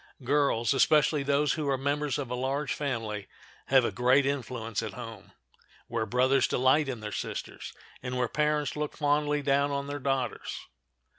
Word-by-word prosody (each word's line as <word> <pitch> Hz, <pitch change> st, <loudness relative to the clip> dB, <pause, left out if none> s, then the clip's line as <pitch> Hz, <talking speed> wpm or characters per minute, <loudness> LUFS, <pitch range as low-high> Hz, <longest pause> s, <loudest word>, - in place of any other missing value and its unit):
Girls, 140 Hz, -3 st, +2 dB
especially 150 Hz, +2 st, +4 dB
those 140 Hz, +1 st, +2 dB
who 150 Hz, -3 st, -2 dB
are 135 Hz, -, +2 dB
members 140 Hz, 0 st, -1 dB
of 135 Hz, -4 st, -5 dB
a -, -, 0 dB
large 135 Hz, +3 st, -1 dB
family, 115 Hz, -8 st, -3 dB, 0.4 s
have 130 Hz, -2 st, +5 dB
a -, -, 0 dB
great 125 Hz, +3 st, +3 dB
influence 120 Hz, -6 st, -2 dB
at 110 Hz, -3 st, -5 dB
home, 115 Hz, -3 st, -9 dB, 0.6 s
where 115 Hz, -2 st, -2 dB
brothers 130 Hz, +3 st, +3 dB
delight 135 Hz, +3 st, +3 dB
in 120 Hz, -4 st, -4 dB
their 105 Hz, -1 st, -5 dB
sisters, -, -, -5 dB, 0.3 s
and 125 Hz, 0 st, -4 dB
where 125 Hz, -1 st, +1 dB
parents 150 Hz, +2 st, 0 dB
look 150 Hz, 0 st, -4 dB
fondly 150 Hz, 0 st, +1 dB
down 140 Hz, +1 st, +2 dB
on 140 Hz, 0 st, -2 dB
their 145 Hz, 0 st, -5 dB
daughters. 130 Hz, -4 st, -2 dB
135 Hz, 165 wpm, -29 LUFS, 125-145 Hz, 0.6 s, have